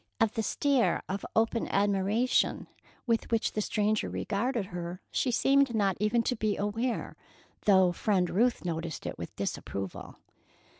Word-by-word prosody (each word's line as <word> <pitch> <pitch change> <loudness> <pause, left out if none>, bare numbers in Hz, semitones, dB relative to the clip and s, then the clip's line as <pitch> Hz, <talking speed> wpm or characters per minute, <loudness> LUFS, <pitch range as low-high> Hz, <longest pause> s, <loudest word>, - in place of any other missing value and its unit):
Of 225 -1 +2
the 225 - -1
stare 270 +3 +1
of 195 +1 -3
open 225 +1 +1
admiration 205 +4 +1 0.4
with 230 -3 0
which 225 -1 +1
the 215 - -1
stranger 210 0 0
regarded 225 +1 -1
her, 175 +1 -5
she 260 - 0
seemed 270 0 +3
not 200 -3 +2
even 215 +3 +2
to 250 - 0
be 215 -2 -1
aware, 225 +4 -2 0.5
though 190 -3 +5
Friend 185 0 +1
Ruth 230 +4 +1
noticed 165 -1 -4
it - - -5
with - - -7
disapproval. 95 -1 -5
215 Hz, 145 wpm, -29 LUFS, 195-235 Hz, 0.5 s, though